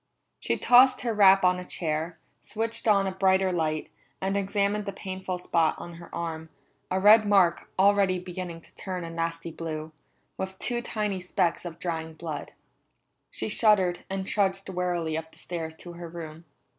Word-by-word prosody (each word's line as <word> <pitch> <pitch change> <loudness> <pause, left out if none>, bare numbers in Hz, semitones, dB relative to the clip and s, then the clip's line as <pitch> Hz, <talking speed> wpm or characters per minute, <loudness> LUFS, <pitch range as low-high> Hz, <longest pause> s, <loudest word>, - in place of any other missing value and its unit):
She - - -1
tossed 255 +1 +6
her 235 -2 -1
wrap 195 -2 +6
on 180 0 +3
a - - -6
chair, 165 -1 -3 0.2
switched 225 +1 -3
on 200 -2 +4
a 190 - -1
brighter 190 0 +2
light, 155 -3 -1 0.3
and 190 +1 -1
examined 200 +1 0
the - - -1
painful 190 -1 -5
spot 165 -2 +1
on 175 - -8
her 170 - -11
arm, 160 -1 -4 0.4
a 185 - 0
red 210 +2 +7
mark 190 -5 +3
already 195 -1 +4
beginning 180 -2 -6
to - - -21
turn 185 -2 -5
a 165 - -6
nasty 165 0 -3
blue, 155 -1 -5 0.5
with 190 0 -4
two 240 +3 -2
tiny 210 -4 -2
specks 180 -1 0
of 170 -1 -6
drying 160 -2 -4
blood. 155 -3 -6 0.8
She - - -4
shuddered, 205 -5 +3
and 190 0 -3
trudged 195 -1 0
wearily 175 -3 -1
up 160 0 -5
the - - -17
stairs 165 -2 -5
to 175 +1 -10
her 170 -1 -8
room. 165 -1 -9
180 Hz, 170 wpm, -27 LUFS, 165-195 Hz, 0.8 s, red